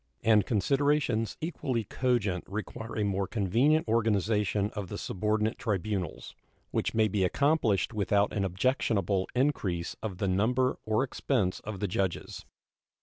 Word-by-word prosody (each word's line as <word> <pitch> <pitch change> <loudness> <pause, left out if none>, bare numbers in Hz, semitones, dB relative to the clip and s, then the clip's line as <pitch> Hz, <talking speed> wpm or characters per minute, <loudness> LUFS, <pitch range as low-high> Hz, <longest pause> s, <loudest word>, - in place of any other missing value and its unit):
And 110 -3 +4
considerations 125 0 +1
equally 135 -7 -2
cogent 105 -6 0
require 110 +3 -6
a 105 - +1
more 100 -1 0
convenient 120 - +2
organization 105 -2 +1
of 105 -3 -5
the 100 - -6
subordinate 110 +3 -1
tribunals, 100 -4 -3 0.4
which - - -1
may 110 -1 +4
be 100 -1 0
accomplished 120 - +2
without 100 -1 +1
an 100 - 0
objectionable 100 -1 0
increase 105 -11 0
of 100 -5 -4
the 100 - -1
number 120 +7 +1
or 110 +4 +2
expense 125 -7 -1
of 105 -2 -7
the 105 - +1
judges. 95 -1 -3
105 Hz, 135 wpm, -29 LUFS, 100-120 Hz, 0.4 s, And